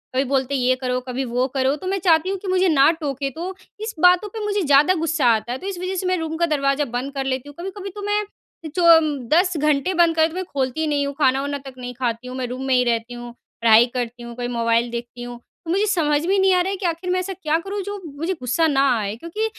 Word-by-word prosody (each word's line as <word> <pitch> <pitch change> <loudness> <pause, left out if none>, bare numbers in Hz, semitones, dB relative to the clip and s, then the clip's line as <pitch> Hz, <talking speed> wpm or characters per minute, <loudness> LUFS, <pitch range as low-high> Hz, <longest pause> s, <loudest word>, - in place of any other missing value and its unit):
कभी 265 - +3
बोलते 270 0 0
हैं 260 - 0
ये 255 +1 +3
करो, 255 -1 -2
कभी 255 +2 -2
वो 250 +1 0
करो। 265 +1 +1
तो 370 +5 -8
मैं 390 0 0
चाहती 335 0 +3
हूँ 390 - -1
कि 395 - -8
मुझे 370 0 +2
ना 285 -2 +5
टोके, 280 -4 -3
तो 355 +7 -6 0.2
इस 435 -1 -5
बातों 360 +4 +5
पे 435 +1 -6
मुझे 410 -1 0
ज़्यादा 290 +3 +5
गुस्सा 325 -3 0
आता 220 +2 -4
है। 255 - -2
तो 380 - -8
इस 380 -3 -4
वजह 370 +1 -3
से 370 - -3
मैं 365 0 +1
रूम 320 -1 -3
का 340 - +2
दरवाज़ा 285 -2 +1
बंद 275 +3 -4
कर 270 -1 -3
लेती 265 +1 -3
हूँ। 290 - -13
कभी-कभी 390 +2 -6
तो 410 - -7
मैं 415 +1 0 0.4
अ, - - -3
चो 360 - +1
अम, 305 -3 0 0.2
10 355 0 +3
घंटे 300 +4 +1
बंद 340 -1 +3
कर, 320 0 +4
तो 325 - -11
मैं 375 - -2
खोलती 265 +2 -1
ही 315 - 0
नहीं 285 -1 0
हूँ, 280 - -4
खाना-वाना 280 +1 +1
तक 265 - -8
नहीं 250 0 -6
खाती 245 0 -3
हूँ, 255 +1 -6
मैं 255 - -2
रूम 255 +2 -6
में 260 - +2
ही 250 - +4
रहती 235 0 -1
हूँ, 240 0 -8 0.3
पढ़ाई 230 +1 +7
करती 245 -1 -4
हूँ, 235 0 -8
कभी 245 -1 -4
मोबाइल 235 0 +1
देखती 240 +1 -6
हूँ। 245 0 -8 0.3
तो 325 - -3
मुझे 400 +3 +2
समझ 305 -6 +1
में 380 - +1
ही 395 - +3
नहीं 380 0 +4
आ 360 - +4
रहा 375 - -1
है - - -2
कि 380 - -5
आख़िर 340 +2 -2
मैं 370 - +1
ऐसा 380 +1 -4
क्या 320 -3 0
करूँ 395 +3 -4
जो 405 0 -6 0.2
मुझे 335 +5 -1
गुस्सा 255 +7 +1
ना 275 -2 +2 0.2
आए, 210 -1 -3
क्योंकि 335 - -4
295 Hz, 280 wpm, -21 LUFS, 255-365 Hz, 0.4 s, पढ़ाई